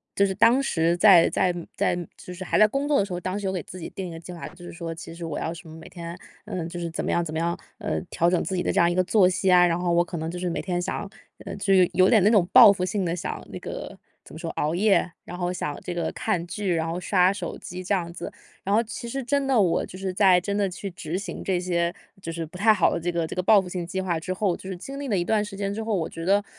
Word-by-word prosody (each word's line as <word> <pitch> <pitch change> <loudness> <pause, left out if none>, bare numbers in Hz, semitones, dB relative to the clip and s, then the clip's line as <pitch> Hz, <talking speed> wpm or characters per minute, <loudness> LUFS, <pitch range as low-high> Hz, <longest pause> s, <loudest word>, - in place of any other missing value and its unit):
就 200 - +3
是 190 - -1
当 230 +6 +5
时 170 -9 +1
在 180 -3 +7
在 180 - +1 0.2
在 - - +1 0.2
就 - - -10
是 185 +1 -7
还 - - 0
在 215 - +7
工 275 +5 -2
作 295 -1 +3
的 - - +3
时 200 - -11
候， 175 - -2
当 185 +3 -3
时 205 - -6
有 - - 0
给 185 -2 -3
自 185 - -10
己 165 - -6
定 190 -1 -6
一 - - -7
个 165 - -8
计 170 - -10
划， 170 - -7
就 175 -1 -15
是 - - -8
说 170 -1 -6
其 165 0 -9
实 170 0 -6
我 160 -3 -4
要 160 - -2
什 170 0 -12
么 160 - -10
每 160 - -11
天， 170 -1 -7 0.3
呃。 185 - -4
就 175 - -6
是 170 -1 -3
怎 165 - -3
么 - - -2
样 170 - +1
怎 155 - -6
么 160 - -1
样， 170 +1 -1 0.2
呃， - - -2
调 170 - +2
整 180 -1 +1
自 190 - -3
己 180 - 0
的 - - 0
这 - - +1
样 170 0 +4
一 - - 0
个 185 +1 +2
作 195 -1 +4
息 185 +1 +1
啊， 180 0 +7
然 170 0 +1
后 175 -1 0
我 170 0 +4
可 175 -1 -6
能 160 +1 -3
就 175 - -5
是 180 0 -2
每 165 - -2
天 180 -2 -2
想 175 - -2
要， 200 - -6 0.4
呃， - - -5
就 195 0 +1
有 185 -2 +6
有 185 +2 +5
点 225 -4 +5
那 205 - +6
种 205 -6 +4
报 - - +10
复 185 -2 -1
性 195 +1 -1
地 170 0 -1
想 180 - -5
那 - - -6
个 - - -7 0.3
怎 - - -12
么 - - -7
说 165 0 -5
熬 155 +3 -1
夜， 200 0 +3
然 180 - -8
后 180 0 -1
想 150 -5 -3
这 180 - -4
个 170 - -1
看 185 -6 -2
剧， 180 +1 -2
然 160 0 -1
后 165 +2 -3
刷 185 0 +3
手 185 -4 -5
机 180 +1 -8
这 195 +2 +1
样 170 -3 -3
子。 - - -6 0.3
然 200 +2 +1
后 225 - +3
其 235 +1 -7
实 270 +2 -3
真 280 +2 0
的 265 -4 +3
我 180 -5 +2
就 185 - -9
是 190 -1 -3
在 185 -2 +5
真 200 +3 -3
的 200 -1 +1
去 195 +2 -6
执 170 -1 -4
行 190 -3 -6
这 185 -2 0
些 170 -1 0 0.3
就 165 - -5
是 165 0 -4
不 160 - -16
太 210 +5 +4
好 215 - +3
的 - - -1
这 175 +1 -2
个 170 -1 -1
这 - - -6
个 185 - 0
报 205 +3 +6
复 190 - -4
性 180 -1 -4
计 190 +2 -3
划 180 -3 -1
之 175 +3 -5
后， 185 -2 0
就 190 - -9
是 185 - -5
经 275 +9 -8
历 285 - -4
了 210 -6 +1
一 175 - +1
段 210 +3 +1
时 210 -1 -8
间 200 0 -2
之 220 +2 -4
后， 220 -1 -1
我 165 -4 -1
觉 165 - -8
得 200 +3 +3
180 Hz, 345 characters per minute, -25 LUFS, 170-200 Hz, 0.4 s, 报